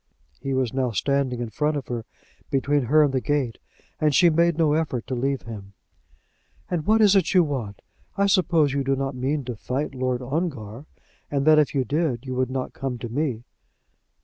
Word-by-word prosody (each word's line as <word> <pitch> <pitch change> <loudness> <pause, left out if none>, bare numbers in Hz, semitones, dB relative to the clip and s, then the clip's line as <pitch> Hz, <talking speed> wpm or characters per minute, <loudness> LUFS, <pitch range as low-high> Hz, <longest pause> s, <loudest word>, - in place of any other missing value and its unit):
He 135 -1 -2
was 130 -3 0
now 130 -1 0
standing 130 +3 0
in 115 -2 -4
front 150 +3 0
of 140 - -6
her, 120 -2 -4 0.4
between 140 0 +1
her 150 +5 +5
and 140 -2 +1
the 130 - +1
gate, 140 -6 -1 0.4
and 150 -2 +2
she 175 +2 +6
made 170 0 +2
no 155 -3 +3
effort 150 -7 -1
to - - -5
leave 135 +1 -1
him. 100 -4 -9 1.0
"And 175 -1 -2
what 220 +1 +4
is 205 -2 +6
it 195 0 +2
you 180 - +7
want? 125 -10 -4 0.3
I 200 - +3
suppose 170 -7 +3
you 140 0 0
do 135 +1 +1
not 135 0 -2
mean 135 +2 -2
to 125 -2 -4
fight 130 +7 -3
Lord 130 -1 -2
Ongar, 135 - -4 0.4
and 140 -1 -1
that 155 0 +7
if 150 -1 +1
you 135 - +2
did 140 -3 -1
you 130 - -4
would 130 0 0
not 130 0 -4
come 135 -2 -4
to 120 0 -6
me." 125 -2 -2
135 Hz, 200 wpm, -24 LUFS, 125-155 Hz, 1.0 s, you